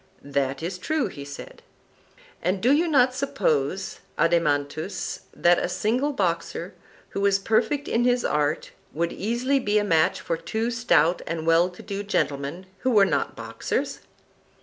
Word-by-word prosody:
That 140 +1 -1
is 180 +2 -4
true, 305 - 0
he 140 - -8
said. 140 0 -10 0.8
And 185 +3 0
do 245 +7 +3
you 320 +5 +3
not 255 -5 +4
suppose, 190 - -1 0.2
Adeimantus, 155 +1 0
that 175 0 +3
a - - -1
single 245 +10 0
boxer 175 -5 -2 0.4
who 200 - -4
was 200 -1 +4
perfect 225 +8 +1
in 230 - +1
his 245 0 +2
art 150 0 0 0.2
would 170 +2 -1
easily 240 +6 0
be 210 -4 +1
a 210 - +3
match 165 -6 +2
for 165 - -2
two 225 +7 -2
stout 185 -8 +3
and 160 -1 -3
well 165 +2 +4
to 180 - -13
do 200 -1 -4
gentlemen 150 -3 -2
who 260 - 0
were 210 -5 +6
not - - -1
boxers? - - -3
190 Hz, 155 wpm, -25 LUFS, 165-235 Hz, 0.8 s, were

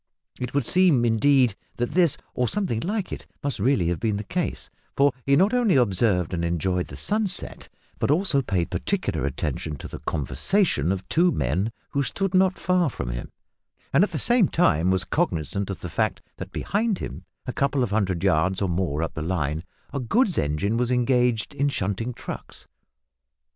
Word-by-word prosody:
It 125 +1 -4
would 140 -4 +2
seem, 170 -9 +4
indeed, 125 +1 +4 0.2
that 120 0 -1
this, 175 -5 +3 0.2
or 125 - 0
something 185 - -1
like 200 - -2
it, - - -8 0.2
must 140 -7 -2
really 100 -6 +2
have 85 -2 -1
been 105 +1 0
the 105 - -4
case, 100 - -3 0.3
for 140 -1 +4
he 140 - +5
not 195 - +4
only 240 -7 +3
observed 100 -7 +2
and 85 -1 -1
enjoyed 90 +2 0
the - - -9
sunset 205 -3 -2 0.3
but - - 0
also 155 -2 +2
paid 95 -9 -1
particular 70 - -1
attention 75 +2 -3
to - - -8
the - - -8
conversation 85 - 0
of 95 -1 -3
two 175 +2 +3
men 90 - 0 0.2
who 140 - +1
stood 195 +7 -2
not 185 0 +3
far 180 -3 +2
from - - -4
him, - - -6 0.6
and 145 +7 +6
at 210 - +1
the - - -2
same 240 -6 +4
time 90 - +2
was 95 0 +2
cognisant 80 +6 -1
of 95 - -5
the - - -4
fact 80 - -1 0.2
that - - -7
behind 210 0 0
him, - - -7 0.2
a 125 - -4
couple 140 -1 +1
of 115 - -2
hundred 95 -5 0
yards 95 0 +2
or 100 - 0
more 85 -3 -1
up 80 - -3
the 80 - -5
line, 80 -2 -1 0.3
a 140 - -1
goods 200 - +2
engine 75 +10 0
was 120 0 0
engaged 125 -2 +2
in 140 +1 +1
shunting 105 0 -2
trucks. - - -8
115 Hz, 185 wpm, -25 LUFS, -, 0.6 s, and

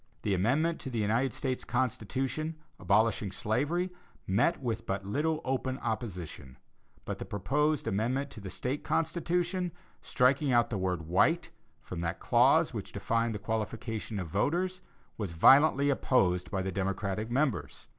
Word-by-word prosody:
The 105 - +1
amendment 140 - +1
to - - -5
the 120 - -4
United 115 +5 +1
States 130 -2 -2
Constitution, 135 +6 -1 0.2
abolishing 105 +1 +2
slavery, 145 - 0 0.3
met 120 - +2
with 115 -4 -3
but 95 0 -2
little 155 +9 0
open 130 0 -1
opposition; 90 - -5 0.5
but - - -4
the - - -4
proposed 145 +10 0
amendment 130 +8 0
to 110 - -10
the 100 - -6
State 130 +9 -3
Constitution, 175 +2 0 0.3
striking 135 +2 +2
out 120 -1 +3
the 105 - -1
word 90 -3 -1
"white" 95 - +2 0.3
from 90 -2 -6
that 85 0 -2
clause - - +4
which - - -5
defined 115 0 0
the 105 +1 -8
qualifications 110 -1 -3
of 90 - -5
voters, 175 - 0 0.4
was 100 -6 -3
violently 140 - +6
opposed 95 -10 +2
by 95 -2 -1
the 95 - -2
Democratic 95 +3 -2
members. 135 +3 -1
115 Hz, 145 wpm, -30 LUFS, 100-140 Hz, 0.5 s, violently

